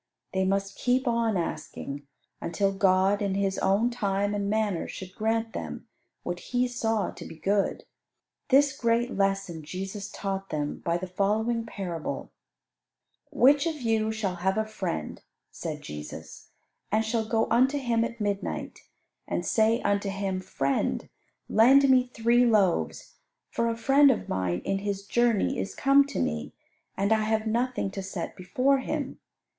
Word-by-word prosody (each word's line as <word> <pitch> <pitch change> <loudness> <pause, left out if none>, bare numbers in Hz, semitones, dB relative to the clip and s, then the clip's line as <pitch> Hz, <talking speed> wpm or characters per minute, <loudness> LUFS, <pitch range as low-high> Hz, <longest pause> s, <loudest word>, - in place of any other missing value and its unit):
They 190 0 +1
must 195 +1 -1
keep 255 +1 +1
on 230 -3 +1
asking, 145 -4 -5 0.3
until 195 +4 0
God 195 +1 +3
in 200 -2 0
His 195 -1 0
own 205 +5 +2
time 205 -3 0
and 200 -1 -1
manner 210 -5 0
should 185 -1 -8
grant 225 +1 -1
them - - -6 0.4
what 175 0 -3
He 250 +4 0
saw 225 -5 -1
to - - -10
be - - -9
good. 195 +4 0 0.7
This 275 +1 +5
great 235 -1 +1
lesson 195 -4 0
Jesus 195 +6 -6
taught 195 -1 -4
them 150 -1 -3
by 170 0 0
the 180 - -4
following 220 +5 0
parable: 175 -7 -5 1.0
"Which 285 +2 +4
of 315 -2 -3
you 220 -3 +1
shall 205 -5 -2
have 190 +3 0
a 220 - +1
friend," 80 - -4 0.3
said - - -6
Jesus, 75 0 -9 0.4
"and 220 +1 +2
shall 220 0 -1
go 225 -1 +2
unto 260 +5 +4
him 235 -4 +1
at 235 0 -4
midnight, 205 -1 -3 0.5
and - - -2
say 225 +1 +2
unto 205 0 +1
him, 195 -1 -2
Friend, 135 -6 -1 0.4
lend 270 +6 +6
me 255 -1 +4
three 235 +1 +3
loaves, 200 - +1 0.3
for 230 0 0
a 230 - -2
friend 275 +5 +5
of 260 - 0
mine 90 -1 -1
in 195 - 0
his 200 0 -3
journey 235 -1 +2
is - - -4
come 275 +1 +5
to - - -6
me, 75 -2 -2 0.4
and 200 +3 +2
I 220 - +2
have 220 0 0
nothing 235 -2 0
to 195 - -5
set 190 -3 -5
before 255 +10 +1
him? 285 +1 -4
210 Hz, 155 wpm, -27 LUFS, 190-235 Hz, 1.0 s, lend